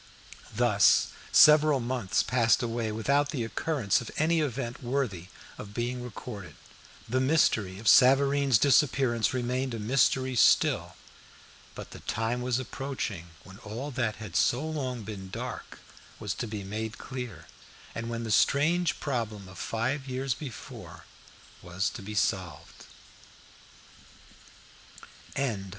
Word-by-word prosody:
Thus, - - +4 0.2
several 150 -2 +7
months 120 -5 0
passed 120 -1 +2
away 115 -1 -2
without 140 +7 +1
the 130 -6 -2
occurrence 130 0 0
of 115 - -8
any 160 +2 +2
event 130 -3 -3
worthy 120 -9 -2 0.3
of 105 0 -9
being 125 +1 -2
recorded. 105 - -8 0.5
The 130 +3 0
mystery 130 -9 +2
of 110 +2 -7
Savareen's 135 +2 +5
disappearance 130 -4 +3
remained 125 0 -2
a - - -5
mystery 130 +3 +2
still. - - +3 0.8
But - - -9
the - - -10
time 115 +2 -2
was 125 -1 0
approaching 130 -9 -5 0.2
when 95 +1 -13
all 120 +7 -6
that 120 -5 -1
had 105 -6 -9
so 125 - +2
long 130 -7 -3
been 100 -2 -8
dark - - -7 0.4
was - - -3
to 120 - -5
be 105 -2 -5
made 110 +3 -5
clear, 120 -11 -7 0.5
and 115 0 -5
when 115 0 -4
the 110 - -4
strange 165 - +2
problem 110 -8 -3
of 95 -1 -12
five 130 +5 -2
years 130 0 -1
before 130 -2 -9 0.6
was 90 +2 -2
to 120 - -8
be 105 +2 -7
solved. 90 -7 -2
120 Hz, 130 wpm, -28 LUFS, 105-135 Hz, 0.8 s, several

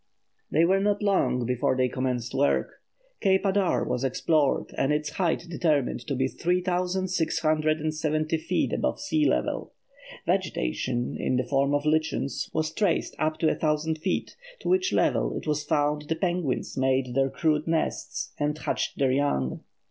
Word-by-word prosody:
Wilson._] 155 - +1
They 165 - +6
were 190 +3 +3
not 205 +1 +1
long 185 - +2
before 130 +2 0
they 130 0 +3
commenced 125 -2 -2
work. 145 +1 0 0.4
Cape 190 0 +2
Adare 195 -1 +2
was 125 - -1
explored 145 +2 +1
and 135 - +1
its 150 0 0
height 170 -2 0
determined 155 -7 0
to 140 - -1
be 130 +1 +1
3670 160 -3 0
feet - - -1
above - - -1
sea 300 +1 +1
level. - - -1 0.5
Vegetation, 125 - -1
in - - 0
the 125 - +1
form 140 +2 +1
of 145 +1 -1
lichens, 155 -3 0
was 155 0 -1
traced 205 -5 0
up 155 0 0
to 160 - +1
a - - +3
thousand 155 0 0
feet, 185 +3 -2 0.3
to - - -3
which 375 +1 +2
level - - +1
it - - -6
was 150 -1 0
found 150 0 +1
the 160 - +1
penguins 175 -5 -1
made 130 -1 +1
their 135 +1 +2
crude 155 +1 0
nests 160 -1 -2
and 150 +1 0
hatched - - -2
their 135 -2 +2
young. 130 - 0
155 Hz, 160 wpm, -27 LUFS, 135-175 Hz, 0.5 s, They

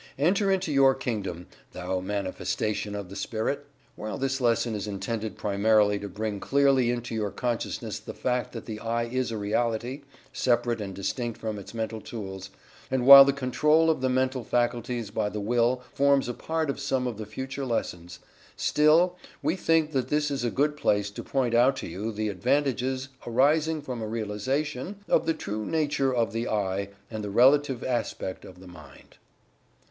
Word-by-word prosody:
Enter 195 +8 +2
into 190 -4 +1
your 135 -1 +5
Kingdom, 95 -7 -4 0.3
thou 90 +1 -2
manifestation 100 +2 -2
of 100 -3 -6
the 100 - -9
Spirit! 115 +8 -3 0.3
While 110 0 -5
this 135 0 -1
lesson 115 -1 +2
is 105 0 -4
intended 110 +2 -4
primarily 105 0 +2
to 100 - -6
bring 105 0 -3
clearly 135 0 +3
into 120 -1 -3
your 110 -2 -1
consciousness 120 +2 -3
the - - -9
fact 125 -1 -1
that 115 - -7
the 110 -2 -6
"I" 115 +1 -1
is 125 +1 -2
a 115 - -3
reality, 115 +5 -1 0.3
separate 120 -2 +1
and 95 -2 -5
distinct 115 +4 -3
from 110 -2 -4
its 100 - -11
Mental 110 -1 -3
Tools, 95 -4 -7 0.4
and 130 -1 0
while 140 0 +12
the 140 - +3
control 150 +4 +3
of 155 - -2
the 130 - +1
mental 130 0 0
faculties 120 -2 -1
by 105 - -1
the 105 - -5
Will 120 +4 +1
forms 140 -1 +3
a 125 - -2
part 160 +2 -2
of - - -8
some 135 -2 -1
of 115 -4 -4
the 110 - -6
future 135 +4 -5
lessons, 90 -8 -3 0.4
still, 165 +4 +3 0.3
we 155 +5 +1
think 165 -4 +2
that 130 -4 0
this 150 0 0
is 135 -3 -2
a 120 - +1
good 150 +4 +1
place 105 -7 +1
to - - -7
point 130 -4 -1
out 125 +3 +5
to - - -6
you 100 +7 -4
the 110 0 -2
advantages 130 +5 0 0.2
arising 150 +5 +2
from 125 -4 -5
a 110 - -3
realization 125 - -2
of - - +2
the 165 - +3
true 105 +1 -4
nature 145 -2 0
of 120 -3 +1
the 115 +1 -2
"I" 100 -2 -1 0.2
and 110 -1 -4
the 105 - -4
relative 135 +3 +4
aspect 120 -6 -3
of 90 - -13
the 95 - -13
Mind. 90 0 -15
120 Hz, 180 wpm, -27 LUFS, 105-135 Hz, 0.4 s, while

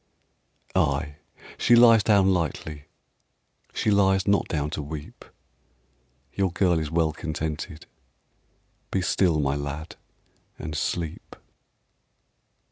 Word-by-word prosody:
Ay, 75 +1 0 0.4
she 120 - +5
lies 115 -2 +7
down 100 -3 +4
lightly, 80 -3 -3 0.9
She 110 - 0
lies 95 -1 +3
not 100 0 +2
down 75 -2 -2
to - - -3
weep: 75 0 -8 1.1
Your 95 -2 0
girl 90 -2 +2
is 80 -2 -3
well 80 0 +1
contented. 80 +1 -5 1.0
Be 95 - -1
still, 85 -4 +2
my 70 -2 +1
lad, 70 +2 -6 0.6
and 75 +1 -6
sleep. 80 0 -4
80 Hz, 105 wpm, -25 LUFS, 75-95 Hz, 1.1 s, lies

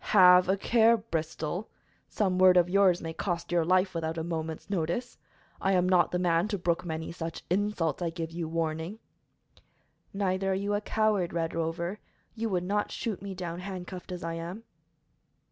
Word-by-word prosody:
"Have 180 -1 +8
a 195 - +3
care, 230 +2 +4
Bristol! 165 -2 -4 0.4
Some 185 -3 0
word 185 -1 +7
of 175 -1 +5
yours 185 -2 +3
may 165 0 -4
cost 170 -1 -3
your 175 -1 +3
life 185 +3 +2
without 165 -1 -3
a 160 - -2
moment's 160 -1 -4
notice. 195 +6 -2 0.4
I 195 - +2
am 180 -1 +3
not 180 -1 +4
the 180 - -1
man 175 +1 +2
to 210 -2 -2
brook 170 -2 0
many 160 -2 -4
such 165 -1 -6
insults. 185 -4 0
I 170 - 0
give 165 -1 -5
you 165 -1 -4
warning." 165 +4 -2 1.1
"Neither 195 -1 0
are - - 0
you 200 +2 -1
a 205 - 0
coward, 215 -5 +1
Red 165 -1 -1
Rover. 170 +4 -2 0.3
You 230 0 -2
would 180 -3 0
not 205 +3 0
shoot 220 -7 -3
me 195 -1 -6
down 175 -1 -5
handcuffed 185 -1 -7
as 180 -2 -5
I 165 0 -3
am." 170 +6 -6
180 Hz, 180 wpm, -29 LUFS, 165-195 Hz, 1.1 s, Have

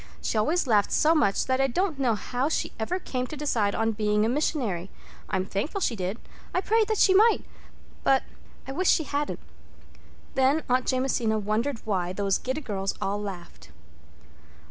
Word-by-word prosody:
She - - -3
always 305 +12 +2
laughed 210 -5 +3
so 315 +2 +4
much 290 -11 +2
that 260 0 +1
I 270 - +3
don't 320 +3 -1
know 245 -5 +2
how 250 +6 -2
she - - -1
ever 225 +12 -1
came 255 -8 -3
to 305 - -7
decide 230 -9 0
on 225 0 +1
being 210 0 +1
a - - +1
missionary. 240 - -1 0.4
I'm 190 -1 0
thankful 215 - -3
she 255 -10 0
did—I 195 - -5
prayed 440 +1 +2
that 435 - 0
she 380 - +5
might—but—I 380 - -1
wish 365 +7 +1
she 320 - +4
hadn't." 290 0 -3 0.9
Then 270 +4 +2
Aunt 255 0 +1
Jamesina 250 -4 +1
wondered 220 +5 -2
why 185 -4 -1
those 195 0 0
giddy 260 +4 -3
girls 195 -6 -3
all 205 +1 -2
laughed. 175 - -8
250 Hz, 165 wpm, -26 LUFS, 205-295 Hz, 0.9 s, she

